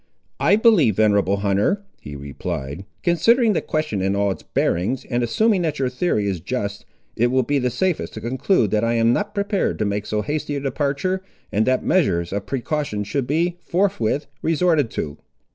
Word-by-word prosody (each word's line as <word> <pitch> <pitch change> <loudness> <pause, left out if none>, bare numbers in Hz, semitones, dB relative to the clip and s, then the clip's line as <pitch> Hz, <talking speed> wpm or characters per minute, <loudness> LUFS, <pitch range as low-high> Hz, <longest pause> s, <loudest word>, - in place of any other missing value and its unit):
"I - - +4
believe, 210 - +4
venerable 100 -2 +3
hunter," 105 - +1 0.2
he 75 - -8
replied, 70 +3 -5 0.2
"considering 215 +7 +4
the - - 0
question 155 -11 -2
in 95 +1 +1
all 100 0 +1
its - - -6
bearings, 95 +10 -1
and 120 0 -1
assuming 195 - +2
that 160 -3 -1
your 130 -2 0
theory 125 - 0
is 95 -3 -1
just, 100 +2 -4 0.3
it 120 - +3
will 130 +1 +2
be 145 +3 +1
the 125 -1 0
safest 170 +8 -1
to - - -5
conclude 125 - +1
that 105 0 +1
I 115 0 +1
am 115 +1 +3
not 205 +5 -2
prepared 200 -1 0
to 105 - 0
make 100 0 -2
so 105 0 -1
hasty 150 0 -2
a - - -1
departure, 140 +7 -1 0.3
and 110 +3 +1
that 130 0 +2
measures 95 - +1
of 100 0 -3
precaution 135 -5 -2
should 120 +5 -2
be, 170 +4 0
forthwith, 170 - 0 0.2
resorted 160 -5 +2
to." 75 -8 -5
130 Hz, 185 wpm, -22 LUFS, 105-170 Hz, 0.3 s, I